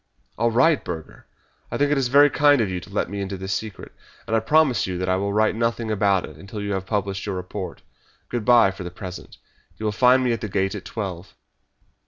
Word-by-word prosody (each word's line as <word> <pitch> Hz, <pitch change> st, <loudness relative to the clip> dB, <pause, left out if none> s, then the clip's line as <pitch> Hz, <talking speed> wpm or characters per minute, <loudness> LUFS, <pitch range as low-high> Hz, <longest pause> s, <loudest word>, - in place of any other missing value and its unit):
"All 115 Hz, +2 st, +1 dB
right, 130 Hz, +7 st, +3 dB
Burger! 80 Hz, -1 st, -8 dB, 0.4 s
I -, -, -3 dB
think 145 Hz, 0 st, +2 dB
it 150 Hz, -, +3 dB
is 130 Hz, -, +1 dB
very 145 Hz, +3 st, +6 dB
kind 145 Hz, -1 st, +4 dB
of 105 Hz, -5 st, 0 dB
you 90 Hz, -, -2 dB
to -, -, -13 dB
let -, -, -1 dB
me 100 Hz, +2 st, -5 dB
into 95 Hz, 0 st, -4 dB
this 95 Hz, +1 st, -3 dB
secret, 105 Hz, 0 st, -6 dB, 0.3 s
and 115 Hz, -1 st, -1 dB
I -, -, +4 dB
promise 130 Hz, -3 st, +3 dB
you 90 Hz, -1 st, -3 dB
that 90 Hz, +1 st, -2 dB
I 95 Hz, -, +2 dB
will 100 Hz, +2 st, -1 dB
write 110 Hz, +1 st, +2 dB
nothing 115 Hz, -1 st, -1 dB
about 100 Hz, -3 st, +2 dB
it -, -, -12 dB
until 100 Hz, +2 st, -8 dB
you 100 Hz, 0 st, -2 dB
have 95 Hz, -1 st, -3 dB
published 100 Hz, -2 st, -2 dB
your 100 Hz, -, -2 dB
report. 90 Hz, 0 st, -6 dB, 0.4 s
Good 120 Hz, -2 st, -3 dB
bye 115 Hz, -3 st, +5 dB
for 95 Hz, -1 st, -8 dB
the 90 Hz, -, -5 dB
present! 90 Hz, 0 st, -9 dB, 0.4 s
You 110 Hz, -, -5 dB
will 105 Hz, -, +1 dB
find 125 Hz, +4 st, +4 dB
me 125 Hz, -, +1 dB
at 115 Hz, -, -4 dB
the 110 Hz, -, -4 dB
Gate 95 Hz, 0 st, 0 dB
at 105 Hz, -, -7 dB
twelve." 95 Hz, -5 st, -6 dB
105 Hz, 240 wpm, -23 LUFS, 95-120 Hz, 0.4 s, very